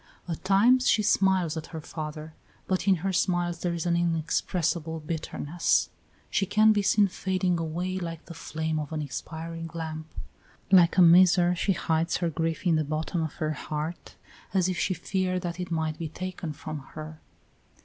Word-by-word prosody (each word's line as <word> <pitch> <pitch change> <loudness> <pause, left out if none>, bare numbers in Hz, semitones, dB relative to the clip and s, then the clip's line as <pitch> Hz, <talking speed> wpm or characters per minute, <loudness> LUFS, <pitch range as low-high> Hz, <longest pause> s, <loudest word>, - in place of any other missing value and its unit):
At 165 -3 -5
times 230 +7 +4
she 215 - +3
smiles 190 -5 +2
at 160 - -5
her 160 - -7
father, 155 0 -7 0.3
but 190 +1 -1
in 195 - +6
her 195 - 0
smiles 175 -1 0
there 175 -1 -1
is 170 - -3
an 170 -1 +2
inexpressible 165 -1 0
bitterness. 160 +1 -1 0.4
She 195 - +1
can 215 +2 +5
be 205 - +1
seen 200 +1 +4
fading 185 -2 -1
away, 175 +3 -2
like 165 -2 -6
the 170 - -9
flame 160 -1 -3
of 150 0 -5
an 155 -1 -2
expiring 165 +3 -6
lamp. 160 -1 -5 0.6
Like 180 -2 +6
a 185 - +8
miser 175 +1 +6
she 190 +3 +1
hides 165 -1 0
her 170 -2 -1
grief 165 +2 -2
in 165 -3 +4
the 155 - +1
bottom 155 +3 -2
of 160 -2 -3
her 155 -2 -2
heart, 155 +2 -5 0.4
as 185 -2 +3
if 185 -2 -2
she 185 - 0
feared 185 +1 -1
that 175 0 -4
it 180 0 -4
might 160 -2 -2
be 165 -2 -4
taken 180 -1 -5
from 150 +1 -6 0.2
her. 155 0 -8
170 Hz, 180 wpm, -27 LUFS, 160-185 Hz, 0.6 s, a